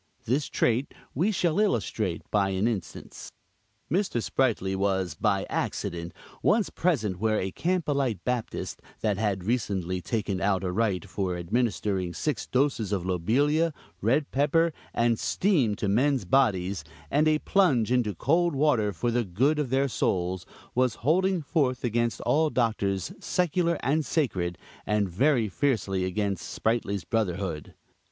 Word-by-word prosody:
This 130 +5 0
trait 120 +4 0 0.2
we 180 +11 +1
shall 175 -2 +1
illustrate 110 - 0
by 100 -2 +2
an 95 +3 +1
instance. 105 -8 -5 0.6
Mr. 185 - 0
Sprightly 110 -6 0
was, 95 -3 0
by - - 0
accident, 85 0 -3 0.3
once 215 -1 +2
present 110 - 0
where 110 0 +1
a 95 - -2
Campbellite 140 - -1
Baptist, 125 -3 -3 0.2
that 105 -3 0
had 100 -4 0
recently 95 -5 -1
taken 100 -2 -2
out 95 -1 +1
a 90 - -1
right 100 -1 0
for 95 -2 -2
administering 95 -2 -1
six 150 - -2
doses 130 -6 0
of 95 -4 -1
lobelia, 145 - +2 0.3
red 135 +8 +1
pepper 155 +4 +2 0.2
and 115 -1 +1
steam 115 - +2
to 100 - -2
men's 130 +3 +2
bodies, 95 - +2 0.3
and 150 +2 +3
a 155 0 +4
plunge 145 - +2
into 120 -6 +1
cold 165 - +2
water 135 -8 +2
for 100 +7 -1
the 120 +1 +1
good 130 - +1
of 145 -4 -1
their 135 +2 +2
souls, 90 -6 -1 0.3
was 125 -2 +2
holding 185 +2 +2
forth 135 -4 0
against 120 0 0
all 155 +1 +2
Doctors, 100 - 0
secular 175 -1 +1
and 155 +3 +1
sacred, 95 - -1 0.3
and 105 -1 +1
very 120 - +2
fiercely 100 -6 0
against 95 -3 -2
Sprightly's 105 -4 -1
brotherhood. 95 -8 -2
115 Hz, 140 wpm, -27 LUFS, 95-145 Hz, 0.6 s, a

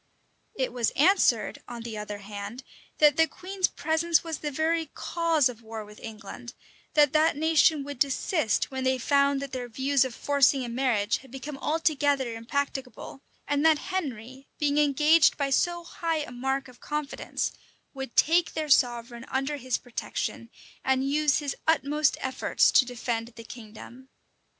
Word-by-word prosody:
It 260 -2 -2
was 240 -3 +1
answered, 285 - +3
on 240 -1 -7
the 230 -2 -6
other 210 -1 -5
hand, 205 +4 -8 0.3
that 295 -2 +5
the 325 0 +5
queen's 370 +4 -2
presence 320 0 +1
was 325 -2 -5
the 300 - -3
very 320 +3 0
cause 330 -5 +1
of 240 -2 -8
war 220 -1 -7
with 210 0 -14
England; 225 +2 -9 0.4
that 295 -2 +5
that 310 0 +3
nation 315 -1 +3
would 285 -2 -8
desist 280 - 0
when 265 -1 -3
they 260 0 +2
found 280 +2 +2
that 275 - -7
their 250 -2 -5
views 270 +3 +2
of 255 -3 -5
forcing 280 -2 +2
a - - -5
marriage 235 -4 +1
had 265 - -16
become 270 +3 -7
altogether 290 -6 +1
impracticable; 270 +3 -4 0.3
and 290 0 +1
that 320 -1 +5 0.2
Henry, 265 -6 -5
being 295 0 +1
engaged 300 +2 +4
by 280 -2 -1
so 345 +5 +1
high 330 -2 -2
a 270 - -9
mark 265 +2 -2
of 250 -1 -16
confidence, 300 -1 -3 0.4
would 270 -3 -7
take 335 +2 +3
their 310 -1 -2
sovereign 240 -2 +2
under 270 +3 -1
his 255 -2 -1
protection, 230 -1 -5 0.3
and 265 0 +1
use 300 -1 +3
his 290 -3 -3
utmost 300 -1 +2
efforts 260 0 +2
to 255 - +5
defend 235 -2 -3
the 230 - -10
kingdom. 235 +3 -12
270 Hz, 160 wpm, -27 LUFS, 245-300 Hz, 0.4 s, that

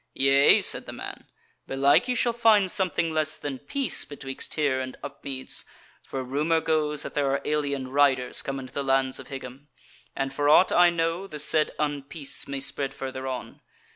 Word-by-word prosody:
"Yea?" 135 +1 +5
said - - +1
the - - -4
man, - - -8 0.4
"belike 140 - +3
ye 250 - 0
shall 245 -1 +1
find 215 -5 +4
something 170 -4 0
less 155 0 0
than 140 -3 -5
peace 280 -3 -1
betwixt 135 -2 -7
here 140 -4 +1
and 130 0 -6
Upmeads, 140 -1 -5 0.4
for 135 -1 -5
rumour 150 +6 +1
goes 150 -2 0
that - - -7
there 145 -2 +1
are 140 - 0
alien 140 -3 -1
riders 135 -2 +2
come 135 0 -4
into 130 -1 -10
the 140 - -2
lands 135 -1 +1
of 130 - -10
Higham, 135 +1 -9 0.5
and 135 0 -2
for 145 0 +1
aught 180 +5 +6
I 175 0 +6
know 170 +2 -1
the 155 - -8
said 155 +1 +2
unpeace 145 0 -3
may 140 0 -3
spread 135 0 -2
further 130 0 -5
on. 130 -2 -6
140 Hz, 180 wpm, -26 LUFS, 135-155 Hz, 0.5 s, aught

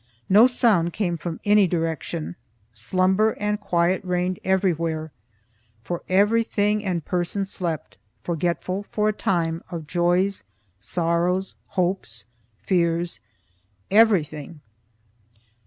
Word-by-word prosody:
No 215 +6 +7
sound 210 -9 +2
came 180 -5 -1
from 165 0 -5
any 205 -1 +5
direction; 160 - -3 0.4
slumber 185 - +1
and 210 0 -1
quiet 180 -2 +1
reigned 180 0 -1
everywhere, 165 -4 0 0.7
for 175 +4 -4
every 205 +5 +4
thing 210 -1 0
and 175 -5 -2
person 180 +2 -1
slept, 160 - -4 0.2
forgetful 175 +3 -2
for 210 0 +1
a - - 0
time 165 -4 -1
of 165 -3 -6
joys, 175 - +1 0.4
sorrows, 175 - 0
hopes, 175 - -2 0.4
fears, 170 -1 +1 0.7
everything. 170 -8 +2
180 Hz, 105 wpm, -24 LUFS, 165-195 Hz, 0.7 s, No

